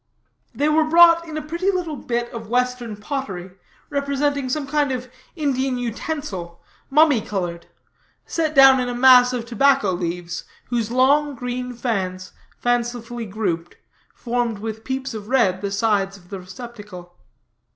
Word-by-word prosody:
They 290 - +1
were 310 +1 +3
brought 335 +1 +6
in 310 -1 -5
a 310 - -4
pretty 340 +5 -1
little 360 -5 -1
bit 240 -2 -3
of 225 -2 -7
western 250 -2 -1
pottery, 205 -6 -5 0.4
representing 280 -1 -1
some 290 +2 -1
kind 290 0 0
of 250 -1 -4 0.2
Indian 270 -4 0
utensil, 230 - -5 0.3
mummy 290 -4 +5
colored, 175 -5 -4 0.6
set 315 -2 -1
down 270 -1 +8
in 250 -1 -1
a 245 - -3
mass 250 0 +7
of 245 -2 -3
tobacco 250 -2 +3
leaves, 175 -1 -4 0.3
whose 235 -3 -1
long, 280 +4 +3
green 250 0 -4
fans, 190 -6 -3 0.3
fancifully 240 -1 -2
grouped, 180 -5 -3 0.4
formed 240 -2 -1
with 220 +1 -6
peeps 265 0 -3
of 210 -2 -7
red 220 -8 +2
the 200 - -2
sides 200 -1 0
of 175 -2 -20
the 195 - -6
receptacle. 185 -2 -10
245 Hz, 145 wpm, -22 LUFS, 205-275 Hz, 0.6 s, down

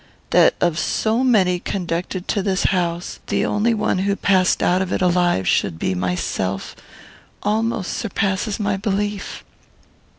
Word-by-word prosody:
That - - +5
of 170 -2 +1
so 225 +3 0
many 190 -8 +3
conducted 180 0 -3
to 205 - +1
this 190 0 0
house 175 -2 -1
the - - 0
only 225 +3 +1
one 210 -3 0
who 200 +1 +1
passed 185 -3 +2
out 180 +1 +3
of 190 - -3
it - - 0
alive 175 - +2
should 80 - +1
be 90 - -1
myself 90 +1 -2 0.7
almost 220 -1 -1
surpasses 200 -1 -1
my 205 -2 0
belief. 205 0 -3
190 Hz, 140 wpm, -21 LUFS, 175-205 Hz, 0.7 s, That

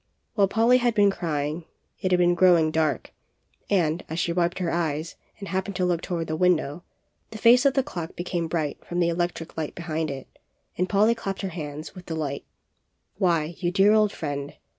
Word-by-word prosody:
While 200 -4 +3
Polly 230 +5 +4
had 240 -2 +1
been 205 -1 +5
crying 155 -2 -3 0.3
it 185 - -1
had 180 - +4
been 175 0 +4
growing 175 -3 +4
dark, 155 -2 -1 0.6
and, 170 -4 +1
as 160 - -4
she 170 -1 0
wiped 175 0 0
her 175 -3 -1
eyes 160 -1 -2 0.2
and 200 - -8
happened 190 +1 -2
to 180 -1 +1
look 175 -2 0
toward 170 -3 -3
the 155 - -3
window, 170 -2 +1 0.5
the 220 - -8
face 245 +5 +6
of 270 - +1
the 270 - +3
clock 175 - -6
became 175 -1 -2
bright 155 -3 -3
from 175 - -4
the 170 -1 +3
electric 170 -1 -3
light 155 -2 -3
62 170 - -6
POLLY'S - - -10
CLOCK, 160 -1 -1
behind - - -6
it, - - -33 0.4
and 180 +1 -1
Polly 215 +2 +4
clapped 195 -4 -5
her 190 - -1
hands 155 -2 -7
with 185 -2 -12
delight. 155 -4 -3 0.8
'Why, 170 -4 +1
you 175 - 0
dear 195 +3 +4
old 215 -1 +4
friend! 145 -4 -5
175 Hz, 205 wpm, -25 LUFS, 160-195 Hz, 0.8 s, face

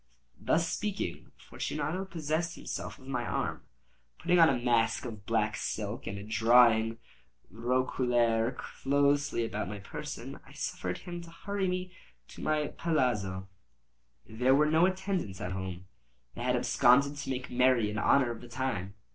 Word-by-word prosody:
Thus 165 +1 +2
speaking, 195 - -3
Fortunato 180 +7 -3
possessed 165 -1 -2
himself - - -6
of 130 - -16
my 125 -3 -1
arm. - - -2 0.6
Putting 180 0 +2
on 165 - +8
a 135 - +2
mask 120 -2 +1
of 105 -4 -8
black 110 -2 +1
silk, 105 0 -4
and 100 +1 -5
drawing 115 0 +5
a - - -18 0.5
roquelaire 120 0 +1
closely 140 -1 +1
about 105 -4 -3
my 105 - -5
person, 100 - -7
I - - -16
suffered 90 -1 -3
him 175 -1 -7
to 170 - -11
hurry 195 +3 -3
me 180 0 -3 0.4
to - - -10
my 150 -1 0
palazzo. 105 - -1 0.8
There 125 +4 +2
were 150 +2 +4
no 165 +3 +5
attendants 185 - -2
at 90 - -4
home; 95 -1 -5 0.5
they - - -8
had 125 +1 +1
absconded 135 +3 +4
to 140 - -5
make 130 -1 -3
merry 125 -4 +3
in 105 - -2
honor 130 +2 +4
of 115 - -7
the 120 - -11
time. 115 -6 -3
125 Hz, 155 wpm, -30 LUFS, 110-150 Hz, 0.8 s, on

